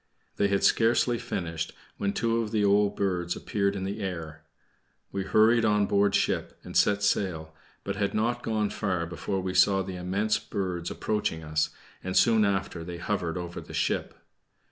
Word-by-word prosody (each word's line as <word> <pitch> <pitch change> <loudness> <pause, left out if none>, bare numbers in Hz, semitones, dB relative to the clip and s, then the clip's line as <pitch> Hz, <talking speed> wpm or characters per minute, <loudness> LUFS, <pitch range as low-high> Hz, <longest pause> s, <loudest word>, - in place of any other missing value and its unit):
They 100 - +3
had 100 -1 0
scarcely 120 +1 +3
finished 85 -1 -4 0.2
when 100 - 0
two 115 +2 0
of 110 - -3
the 105 -1 +1
old 100 0 +3
birds 90 -3 -1
appeared 100 -1 -1
in 95 - -3
the 100 +3 -3
air. 80 -5 -5 0.7
We 100 - -2
hurried 110 +4 +4
on 105 -2 +3
board 100 0 +2
ship - - 0
and - - -9
set 105 0 +3
sail, 85 -6 0 0.3
but 100 0 -3
had 100 -1 -1
not 120 +3 0
gone 110 -3 -1
far 90 -5 -1
before 95 +3 -3
we 95 0 -3
saw 95 -1 +4
the 95 -1 -6
immense 100 +5 0
birds 90 -3 -3
approaching 105 -7 -2
us, 75 0 0 0.3
and 95 0 -1
soon 110 -2 +5
after 95 -4 -1
they 85 +1 -6
hovered 90 -2 -2
over 85 -1 -5
the - - -9
ship. - - -1
100 Hz, 175 wpm, -28 LUFS, 90-105 Hz, 0.7 s, soon